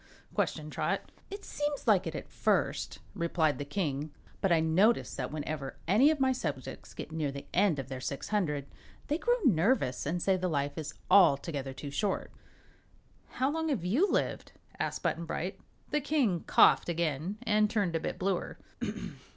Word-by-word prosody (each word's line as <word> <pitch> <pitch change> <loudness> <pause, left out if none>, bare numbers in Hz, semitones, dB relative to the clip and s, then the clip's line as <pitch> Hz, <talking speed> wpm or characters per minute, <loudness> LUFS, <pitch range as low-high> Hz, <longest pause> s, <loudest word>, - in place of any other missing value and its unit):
questioned 155 0 -1
Trot. - - -2 0.2
"It 400 +1 -7
seems 290 -1 -3
like - - +4
it, - - -4
at - - -5
first," - - 0 0.2
replied 170 -5 +1
the 145 - -3
King, 150 -3 -2 0.3
"but 195 - +2
I 170 - +5
notice 185 +9 +3
that 125 0 -4
whenever 150 -2 -4
any 220 - +6
of 310 -2 +1
my 265 -1 +3
subjects 255 - -5
get - - -7
near 155 -3 -1
the 140 0 -7
end 195 -7 +3
of 135 -2 -4
their 130 -1 -6
six 140 +1 -4
hundred, 150 -10 0 0.4
they 300 +3 +1
grow 485 +4 +2
nervous 175 - +2
and 175 +4 0
say 190 +2 +2
the 185 0 -1
life 145 -3 -1
is 150 -2 -5 0.2
altogether 145 -6 +4
too 140 +1 -7
short." 195 +7 -1 1.0
"How 265 +2 +1
long 320 +1 -1
have 215 - -1
you 275 - +3
lived?" - - -1 0.3
asked - - -2
Button 170 +1 0
Bright. 180 +4 -4 0.3
The 300 0 +1
King 260 - +1
coughed - - +5
again 170 +3 -1
and 215 -2 +3
turned 200 -6 0
a - - +2
bit - - -4
bluer. 185 -1 -1
175 Hz, 175 wpm, -31 LUFS, 150-220 Hz, 1.0 s, any